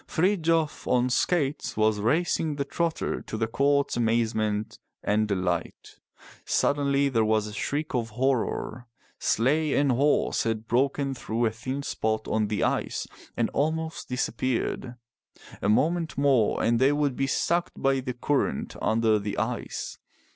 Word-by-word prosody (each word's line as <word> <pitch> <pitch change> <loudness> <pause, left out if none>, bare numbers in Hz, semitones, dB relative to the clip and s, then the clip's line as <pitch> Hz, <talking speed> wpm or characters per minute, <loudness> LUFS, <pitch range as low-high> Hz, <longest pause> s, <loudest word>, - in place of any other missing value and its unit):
Frith 185 +3 +1
jof 160 -1 0
on 125 0 +2
skates 145 -1 0
was 110 -1 +2
racing 155 +6 +1
the 140 -1 -2
trotter 165 +3 -2
to - - -6
the 115 - +1
court's 140 +4 +1
amazement 110 -2 0 0.2
and 105 +1 +1
delight. 90 -4 -3 0.4
Suddenly 140 -1 +2
there 115 -4 +2
was 110 -1 +2
a 105 - -7
shriek 145 +6 -2
of 115 -2 -1
horror. 125 0 -1 0.3
Sleigh 145 +6 +2
and 140 -1 +3
horse 140 +4 +2
had 110 -1 -2
broken 135 +2 +1
through 120 -2 -2
a 110 - +2
thin 130 +5 -5
spot 110 -5 -2
on 110 -1 +1
the 105 0 -1
ice - - -1 0.3
and - - +1
almost 160 +2 -2
dis 125 0 0
appeared. 125 0 -2 0.7
A - - +1
moment 160 +8 +1
more 135 -6 +3
and 115 0 +2
they 135 +2 +5
would 145 -3 +1
be 135 - 0
sucked 170 +5 0
by 135 0 +2
the 125 -1 -4
current 130 - -1
under 110 -1 +2
the 100 0 -4
ice. 115 +3 -3
125 Hz, 150 wpm, -27 LUFS, 110-145 Hz, 0.7 s, they